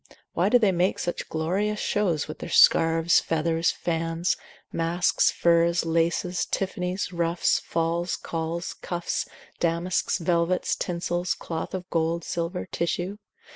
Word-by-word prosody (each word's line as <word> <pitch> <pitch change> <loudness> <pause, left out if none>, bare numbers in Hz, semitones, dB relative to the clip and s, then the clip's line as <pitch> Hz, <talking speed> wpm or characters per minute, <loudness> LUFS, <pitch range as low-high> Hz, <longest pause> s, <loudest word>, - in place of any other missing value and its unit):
why - - +2
do 245 - +6
they 215 -5 +3
make 180 +1 +1
such 175 - -4
glorious 195 +7 -1
shows 180 -8 0
with 155 - -8
their - - -6
scarves, 165 +1 +5
feathers, 165 +1 0
fans, 165 +1 -1 0.4
masks, 170 +2 +2
furs, 170 0 +2
laces, 170 +2 0
tiffanies, 185 0 -2
ruffs, 170 0 +1
falls, 170 +2 -1
calls, 165 +1 -4
cuffs, 175 -1 -3 0.3
damasks, 170 +2 0
velvets, 170 0 +1
tinsels, 175 0 -2
cloth 165 +2 -5
of 180 -1 -6
gold, 165 0 0
silver, 170 +2 -3
tissue? 180 +4 -2
170 Hz, 125 wpm, -26 LUFS, 165-180 Hz, 0.4 s, do